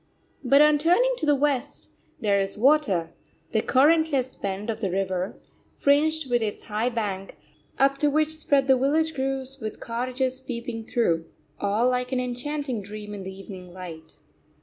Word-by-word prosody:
But 280 +3 +6
on 300 -1 +4
turning 360 +11 +4
to 310 - -2
the 295 - +5
West, 280 -2 -1 0.3
there 200 -3 +2
is 195 +1 -2
water, 215 - +3 0.4
the 220 - +2
currentless 280 -1 +3
bend 200 +3 -3
of 220 - -7
the 195 - 0
river, 185 0 -2 0.4
fringed 305 +1 +2
with 240 -1 +1
its 210 -2 -3
high 215 +3 -1
bank, 205 -5 -4 0.4
up 275 0 +3
to 295 - +3
which 310 +2 +1
spread 285 -3 +2
the 265 -1 +5
village 310 +5 +1
groves 270 0 -3
with 220 -3 -6
cottages 255 +2 -2
peeping 235 -3 -5
through 170 -9 +1 0.3
all 205 +4 +1
like 250 0 0
an 260 - +1
enchanting 250 0 -3
dream 210 +1 -8
in 205 - -6
the 190 0 -6
evening 190 -2 -10
light. 165 -4 -9
250 Hz, 165 wpm, -25 LUFS, 205-280 Hz, 0.4 s, But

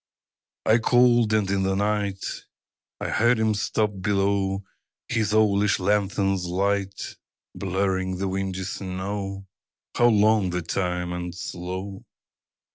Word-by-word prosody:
I 110 +2 +5
called. 120 -1 +4
And 110 -2 +2
in 100 -1 +1
the 95 0 +1
night 100 -1 -1 0.7
I - - -3
heard 120 +2 +3
him 110 -1 +2
stop 105 -1 -1
below, 100 0 +1 0.4
His 110 -3 0
owlish 105 -1 +3
lanthorn's 95 -1 +1
light 100 +2 -1 0.4
Blurring 95 -1 -1
the 95 +1 -1
windy 95 0 -2
snow 95 +1 -4 0.5
How 120 - +5
long 105 -3 +4
the 90 -1 -2
time 90 0 -2
and 90 0 -5
slow! 95 +3 -6
100 Hz, 120 wpm, -25 LUFS, 95-105 Hz, 0.7 s, I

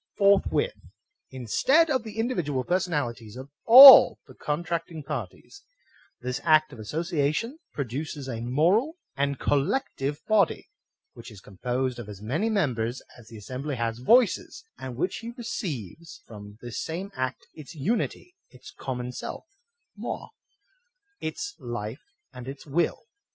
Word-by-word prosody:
^ - - -42
Forthwith, 200 - +3 0.6
instead 265 - +2
of 260 -3 +1
the 220 -1 -10
individual 175 - -1
personalities 145 - -2
of 130 +2 -10
all 265 +4 +11
the - - -15
contracting 165 0 -4
parties, 395 - -7 0.6
this 125 +2 -4
act 155 -1 +4
of 120 - -12
association 160 - -2
produces 140 +1 -5
a 115 -3 -5
moral 180 - +1 0.2
and 140 0 -1
collective 145 - -1
body, 210 -5 +2 0.5
which - - -11
is 105 - -13
composed 125 +6 -3
of 110 -3 -8
as 100 -2 -9
many 145 - -1
members 125 - -1
as 120 -3 -16
the 115 - -11
assembly 130 +7 -5
has 115 -1 -3
voices, 230 - +2 0.2
and 130 -2 -7
which 185 - -3
receives 170 - -6
from 105 -2 -12
this 120 -3 -5
same 180 +5 -5
act 130 -5 -4
its 150 -2 -12
unity, 225 - -2
its 125 -1 -14
common 125 -1 -5
self - - -7 0.6
{nioi)^ - - -5 0.9
its 410 -2 -5
life, 120 -1 -6 0.3
and 125 0 -10
its 135 0 -8
will. 155 +4 -1
140 Hz, 135 wpm, -26 LUFS, 125-190 Hz, 0.9 s, all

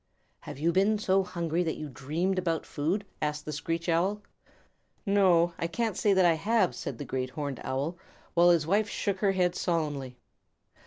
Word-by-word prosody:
"Have - - -9
you 165 +4 +1
been 200 +4 +3
so 195 -2 +2
hungry 170 -2 -2
that 165 -2 -1
you 155 - -5
dreamed 160 +8 -1
about 165 -3 -1
food?" 170 +8 -2 0.2
asked 150 0 -2
the 155 - -4
Screech 165 +3 -3
Owl. 185 +5 +1 0.8
"N 200 - 0
no, 175 -4 +4
I 165 - 0
can't 225 +3 -2
say 205 - +2
that 190 -2 +4
I 170 - +5
have," 200 +4 +1
said - - -5
the 145 - -6
Great 130 0 -3
Horned 140 0 -5
Owl, 145 +6 -3 0.3
while 175 +1 +5
his 170 -3 +4
wife 205 +5 +1
shook 195 -2 -2
her 195 -1 +2
head 180 -2 +2
solemnly. 145 -8 -2
170 Hz, 190 wpm, -29 LUFS, 155-190 Hz, 0.8 s, I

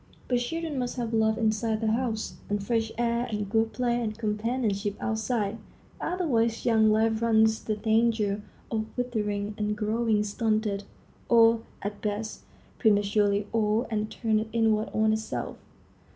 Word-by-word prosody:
But 245 -1 +2
children 315 +3 -3
must 245 -1 -2
have 235 -2 -2
love 220 0 +2
inside 220 -1 +1
the 220 -1 +1
house, 225 -2 -2
and 205 -1 -1
fresh 225 0 0
air 235 0 0
and 210 -2 -2
good 225 +2 +1
play 240 -1 0
and 215 -1 -3
companionship 210 -2 -1
outside; 220 -1 -1 0.4
otherwise 235 -11 0
young 220 -2 +4
life 220 +1 +2
runs 220 -1 +3
the 215 - -1
danger 220 -1 +1 0.3
of 220 -1 -1
withering 210 -4 -2
and 210 0 -1
growing 215 0 +1
stunted, 210 -1 -1 0.4
or, 230 -1 +6 0.2
at 205 +1 -4
best, 210 +1 -3 0.4
prematurely 205 -1 +3
old 220 0 +2
and 215 0 -1
turned 220 -1 0
inward 220 -1 +2
on 215 0 +2
itself. 220 0 -3
220 Hz, 140 wpm, -27 LUFS, 210-230 Hz, 0.4 s, or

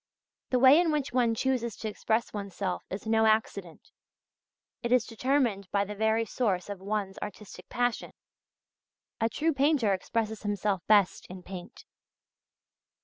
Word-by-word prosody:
The 255 - +2
way 265 +5 +7
in 340 -3 +1
which 295 -5 -2
one 240 -3 +2
chooses 235 -3 -1
to 220 - -5
express 220 +2 -1
oneself 200 -2 -4
is 195 +3 -6
no 220 0 +3
accident; 200 -5 -1 0.9
it 235 - -3
is 250 -2 +4
determined 235 -5 0
by 200 0 +1
the 210 - -6
very 220 +2 +1
source 205 -6 -1
of 200 -2 -5
one's 200 -1 -3
artistic 210 0 -9
passion. 245 -1 -1 1.1
A 225 - +1
true 320 +7 0
painter 275 -7 +2
expresses 220 +3 -2
himself 205 -2 -1
best 205 -3 +3
in 185 0 -10
paint. 180 -1 -10
220 Hz, 145 wpm, -29 LUFS, 200-245 Hz, 1.1 s, way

